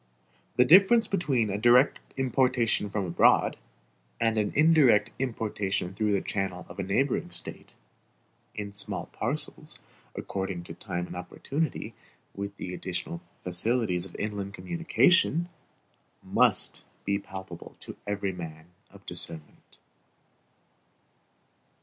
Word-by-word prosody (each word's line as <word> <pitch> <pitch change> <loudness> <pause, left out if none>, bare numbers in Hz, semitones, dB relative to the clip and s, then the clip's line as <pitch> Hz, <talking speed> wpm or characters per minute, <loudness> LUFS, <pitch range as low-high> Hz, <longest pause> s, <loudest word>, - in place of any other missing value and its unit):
The 125 +1 +5
difference 200 - +7
between 135 - +1
a 100 - -2
direct 120 +5 +5 0.2
importation 125 -5 +2
from 100 -1 -2
abroad, 85 -1 +4 0.6
and 115 -1 +2
an 105 -1 +1
indirect 140 -9 +5
importation 105 -7 -2
through 105 +1 0
the 100 - +2
channel 95 -4 -3
of - - -11
a - - 0
neighboring 120 +1 0
State, 85 0 -8 0.8
in 100 -1 -5
small 100 -1 -2
parcels, - - -3 0.4
according 95 -2 -4
to - - -8
time 90 0 -4
and - - -9
opportunity, 135 - -3 0.4
with 100 0 -6
the 90 - -5
additional 90 -2 -4 0.2
facilities 90 0 +1
of 85 - -16
inland 100 -1 -4
communication, 175 0 +2 0.7
must - - +2 0.2
be 100 0 +1
palpable 95 -3 -9
to - - -7
every 100 -1 -1
man 80 -2 -8 0.2
of - - -17
discernment. 80 -2 -5
105 Hz, 115 wpm, -28 LUFS, 95-125 Hz, 0.8 s, difference